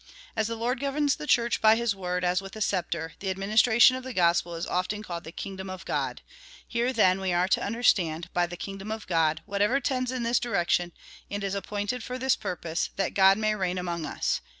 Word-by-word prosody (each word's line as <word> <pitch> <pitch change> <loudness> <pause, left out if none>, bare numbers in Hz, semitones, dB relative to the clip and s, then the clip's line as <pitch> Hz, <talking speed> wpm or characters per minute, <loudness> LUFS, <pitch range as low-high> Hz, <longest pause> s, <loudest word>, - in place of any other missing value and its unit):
As 215 - +1
the 230 - -3
Lord 240 +3 -1
governs 285 +1 +1
the 300 - -7
Church 235 -3 +2
by 220 0 +7
his 230 -3 0
word, 180 -1 -3
as 180 +1 +2
with 195 +1 -10
a - - -7
sceptre, 170 -5 -1
the 195 - -3
ad 190 - -2
ministration 220 +5 +5
of 260 - -6
the 260 0 -6
gospel 170 -1 +2
is 165 - -3
often 195 +4 -2
called 170 -4 -6
the 160 - -8
kingdom 190 +1 -6
of 185 -1 -7
God. - - -2 0.4
Here, 240 +1 0
then, 195 -6 +3
we 190 -1 0
are 175 +1 +2
to - - +2
understand 180 -7 +1
by 175 0 +2
the 175 +1 -8
kingdom 195 +2 -7
of 220 0 -5
God 160 -3 +1
whatever 205 +7 +1
tends 255 -1 -1
in 255 -2 -3
this 235 +1 +2
direction, 175 -5 0 0.4
and 205 0 -4
is 195 -1 -2
appointed 205 +4 -3
for 250 - -5
this 260 0 +2
purpose 170 -2 -3
— - - -35
that 195 -2 -1
God 195 0 +6
may 215 0 +1
reign 185 -3 -1
among 170 -3 -3
us. - - -1
195 Hz, 225 wpm, -27 LUFS, 180-235 Hz, 0.4 s, by